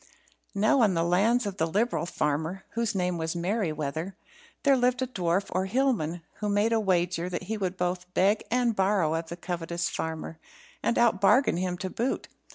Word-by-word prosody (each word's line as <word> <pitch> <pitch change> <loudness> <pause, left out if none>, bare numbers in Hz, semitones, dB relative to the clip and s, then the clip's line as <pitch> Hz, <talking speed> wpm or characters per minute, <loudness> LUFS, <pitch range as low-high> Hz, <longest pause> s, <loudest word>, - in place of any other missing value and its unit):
Now 215 +6 +3
on 205 -5 +3
the 165 - +2
lands 210 +8 +2
of 200 -1 -4
the 160 - +1
liberal 210 +2 0
farmer 160 +4 -2
(whose 230 -2 -1
name 180 -2 0
was 160 +1 -2
Merryweather) 170 -3 -2 0.5
there 280 -1 +5
lived 250 0 +2
a - - +1
dwarf 190 -5 0
or 190 +1 0
hillman, 190 - 0
who 210 - -2
made 205 +3 +2
a 225 - +3
wager 180 -3 0
that 180 - -4
he 215 +4 -3
would 190 -3 -3
both 180 0 -2
beg 200 +4 +3
and 240 -2 +1
borrow 190 -5 +2
of 165 0 -3
the 170 - -6
covetous 170 -1 -3
farmer, 160 0 -5 0.4
and 235 - +1
out 230 -5 +3
bargain 225 -1 +4
him 180 0 -2
to 185 +1 -4
boot. 245 +3 -2
185 Hz, 185 wpm, -27 LUFS, 170-220 Hz, 0.5 s, there